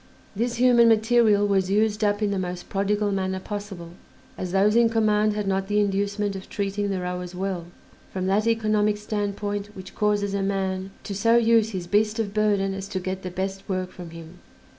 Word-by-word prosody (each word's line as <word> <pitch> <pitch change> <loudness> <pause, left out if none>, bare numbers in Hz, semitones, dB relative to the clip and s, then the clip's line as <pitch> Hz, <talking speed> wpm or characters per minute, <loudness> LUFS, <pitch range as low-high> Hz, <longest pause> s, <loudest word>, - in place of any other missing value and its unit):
This 235 +3 -1
human 240 -1 +5
material 220 -2 +4
was 190 -2 +1
used 210 +1 +1
up 205 +1 +1
in 205 - +1
the 195 - -1
most 180 -1 -5
prodigal 205 +1 0
manner 190 -1 -1
possible, 200 -4 -7 0.5
as 180 -1 -5
those 200 +3 +3
in 235 -1 +5
command 215 -1 +2
had 210 -1 -3
not 195 0 0
the 210 +1 +1
inducement 200 0 0
of 190 - -8
treating 200 0 -2
the 195 -1 -1
rowers 180 0 -5
well, 185 -2 -3 0.4
from 185 -1 -3
that 205 +4 +1
economic 215 -2 +2
standpoint 205 -1 -3
which 190 -1 -10
causes 205 -1 0
a 200 - 0
man 190 -1 -2
to 200 - -5
so 230 +4 +3
use 230 -1 +4
his 185 -5 -5
beast 210 +4 +1
of 210 -3 -2
burden 205 -2 +1
as 195 0 -5
to 195 -1 -3
get 185 +1 -4
the 185 - -5
best 190 +2 -5
work 185 -1 -2
from 175 -2 -9
him. 165 +1 -11
200 Hz, 195 wpm, -24 LUFS, 190-210 Hz, 0.5 s, human